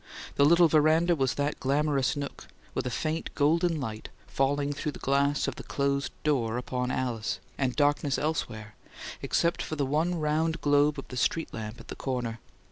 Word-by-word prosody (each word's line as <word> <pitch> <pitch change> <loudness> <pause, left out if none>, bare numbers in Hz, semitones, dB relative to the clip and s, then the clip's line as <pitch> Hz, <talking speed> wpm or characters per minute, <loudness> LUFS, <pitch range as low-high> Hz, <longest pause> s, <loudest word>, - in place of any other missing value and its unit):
The 140 - +4
little 170 +3 +6
veranda 160 +3 +4
was 135 -5 0
that 145 +1 -1
glamorous 140 0 +1
nook, 140 -1 -6 0.3
with - - -2
a - - 0
faint 155 +6 -2
golden 165 +3 +2
light 110 -5 -5 0.2
falling 145 +1 0
through 150 +1 -3
the - - -8
glass 140 +1 +1
of - - -3
the - - -7
closed 140 0 -1
door 125 -6 +1
upon 125 0 -2
Alice, 120 -4 -2 0.2
and 130 -3 -1
darkness 145 -1 +2
elsewhere, 110 -9 -3 0.5
except 170 0 +1
for 155 - -4
the 145 -2 0
one 160 +5 0
round 160 +2 0
globe 145 +1 +3
of 135 - -7
the 125 - -6
street 160 +6 0
lamp 110 0 -6
at - - -14
the - - -5
corner. 120 -4 -3
145 Hz, 180 wpm, -28 LUFS, 130-155 Hz, 0.5 s, little